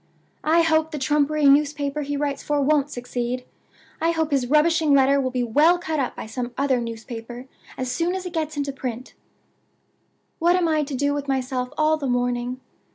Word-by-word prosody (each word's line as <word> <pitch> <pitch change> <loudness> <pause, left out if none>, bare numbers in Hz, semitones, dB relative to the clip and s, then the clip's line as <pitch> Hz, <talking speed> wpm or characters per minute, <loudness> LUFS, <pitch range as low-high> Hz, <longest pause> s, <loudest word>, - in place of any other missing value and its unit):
I 330 +2 +4
hope 320 -1 +2
the 305 - -5
trumpery 295 +2 +1
newspaper 285 +1 +3
he 290 0 -3
writes 285 -1 -2
for 295 -1 -1
won't 285 0 +2
succeed! 245 -1 -4 0.6
I 330 - +2
hope 320 -2 0
his 270 -3 +1
rubbishing 305 +1 +3
letter 275 +1 +4
will 260 - -1
be 250 -1 -1
well 300 +9 +4
cut 320 -3 -3
up 255 - -2
by - - -6
some 240 +2 -5
other 270 -2 +1
newspaper 230 +1 -7 0.3
as 255 -1 -3
soon 345 +5 0
as 375 -1 -5
it 360 - -6
gets 310 -2 -3
into 280 -1 -2
print! 255 -2 -6 1.3
"What 345 +2 +4
am 360 -2 +2
I 310 -1 +2
to 280 -1 -5
do 285 +2 +1
with 285 -1 -4
myself 260 -1 -1
all 310 0 +3
the 285 -3 -4
morning? 245 0 -1
280 Hz, 190 wpm, -23 LUFS, 250-310 Hz, 1.3 s, I